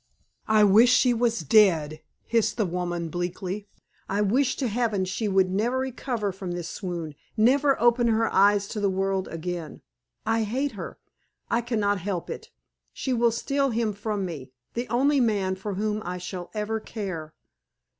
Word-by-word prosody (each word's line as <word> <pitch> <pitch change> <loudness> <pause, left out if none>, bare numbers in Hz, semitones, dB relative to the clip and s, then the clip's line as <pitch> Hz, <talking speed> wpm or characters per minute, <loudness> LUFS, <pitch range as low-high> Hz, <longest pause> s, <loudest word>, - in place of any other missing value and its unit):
"I 215 -1 +5
wish 210 +4 +6
she 250 0 +4
was 235 -3 +1
dead!" 160 -3 +3 0.2
hissed 220 -2 +1
the 215 - +2
woman, 175 -1 -3
bleakly. 180 +4 -4 0.4
"I 200 +2 0
wish 250 +6 +2
to 265 - -1
Heaven 220 -4 0
she 195 +4 -2
would 190 -2 +2
never 225 +7 0
recover 250 -5 -2
from 185 -1 -6
this 175 -1 -4
swoon, 170 -5 -5 0.2
never 270 +5 +4
open 240 0 +4
her 225 0 +2
eyes 200 +1 +4
to 215 - -4
the 200 -1 +2
world 190 0 -1
again. 165 -1 -6 0.4
I 225 0 +2
hate 260 +7 -1
her. 205 -5 -7 0.5
I 235 - +2
can 235 -1 -2
not 205 -1 +1
help 180 -1 -3
it. - - -7 0.4
She 260 - -2
will 235 -1 +3
steal 275 +4 0
him 225 -2 0
from 205 -1 -3
me 145 -7 -7 0.2
the 240 +1 -3
only 275 +5 +3
man 205 -6 +1
for 195 +1 -5
whom 215 +2 -1
I 180 +1 -4
shall 180 0 -6
ever 215 +1 -1
care. 185 -9 -6
210 Hz, 170 wpm, -26 LUFS, 185-235 Hz, 0.5 s, wish